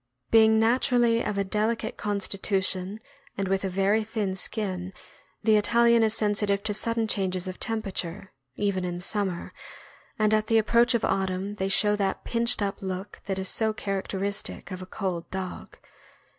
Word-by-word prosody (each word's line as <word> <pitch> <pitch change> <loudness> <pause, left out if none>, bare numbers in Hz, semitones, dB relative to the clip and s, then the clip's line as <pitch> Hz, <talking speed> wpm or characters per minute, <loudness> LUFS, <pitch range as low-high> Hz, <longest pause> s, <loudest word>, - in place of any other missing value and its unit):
Being 220 -1 +6
naturally 235 0 +3
of 210 - -2
a 200 - +2
delicate 215 +3 -1
constitution 195 -1 -1 0.4
and 195 -1 -1
with 195 +1 0
a 190 - -1
very 195 +4 +2
thin 210 -3 -2
skin, 190 -2 +1 0.5
the 215 0 +5
Italian 235 +2 +4
is 220 0 +3
sensitive 205 -2 +1
to 215 - -1
sudden 230 +1 -1
changes 185 -3 -1
of 185 - -6
tem 225 -2 0
perature, 190 -1 -4 0.3
even 200 -2 -1
in 175 -1 -3
summer, 190 -1 -2 0.6
and 215 0 +2
at 215 0 +2
the 225 - +3
approach 235 +3 +4
of 235 - +1
autumn 190 +1 -1
they 190 0 -1
show 210 +2 +3
that 195 -2 -1
"pinched 235 -2 0
up" 200 -1 -3
look 190 +1 -5
that 195 -1 -2
is 190 0 -2
so 220 +2 +1
character 195 -2 -3
istic, 200 -2 -3
of 185 0 -6
a 185 - -8
cold 185 -3 -4
dog. 190 -1 -6
200 Hz, 170 wpm, -26 LUFS, 190-220 Hz, 0.6 s, Being